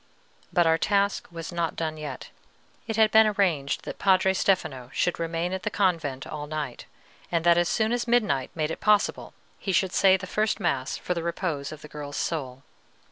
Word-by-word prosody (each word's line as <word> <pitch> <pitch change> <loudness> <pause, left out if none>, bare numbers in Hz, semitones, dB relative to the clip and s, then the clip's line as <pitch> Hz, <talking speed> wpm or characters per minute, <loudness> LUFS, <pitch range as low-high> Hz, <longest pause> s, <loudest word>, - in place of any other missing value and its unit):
But 175 - +3
our 165 0 +3
task 200 -1 +1
was 165 0 -7
not 170 -1 -2
done 160 -1 -2
yet. 150 -4 -7 0.6
It 225 - -2
had 220 -1 +5
been 220 0 +7
arranged 180 -9 0
that - - -7
Padre 190 -1 +4
Stefano 160 -10 0
should 175 - 0
remain 165 +2 -2
at 190 - -3
the 210 - -2
convent 165 -10 0
all 150 -1 -6
night, 150 -4 -5 0.5
and 170 -2 +1
that 170 0 +6
as 175 0 +2
soon 220 0 +1
as 245 0 -1
midnight 210 - +2
made 155 -1 -1
it - - -5
possible 210 -1 +1 0.2
he 195 - -2
should 190 0 +2
say 190 -1 +5
the 185 - -7
first 215 +3 0
mass 140 -9 -1
for 180 - -2
the 170 - -3
repose 165 -4 -3
of 155 -1 -10
the - - -8
girl's 145 -1 -7
soul. 135 -5 -3
170 Hz, 195 wpm, -26 LUFS, 150-195 Hz, 0.6 s, been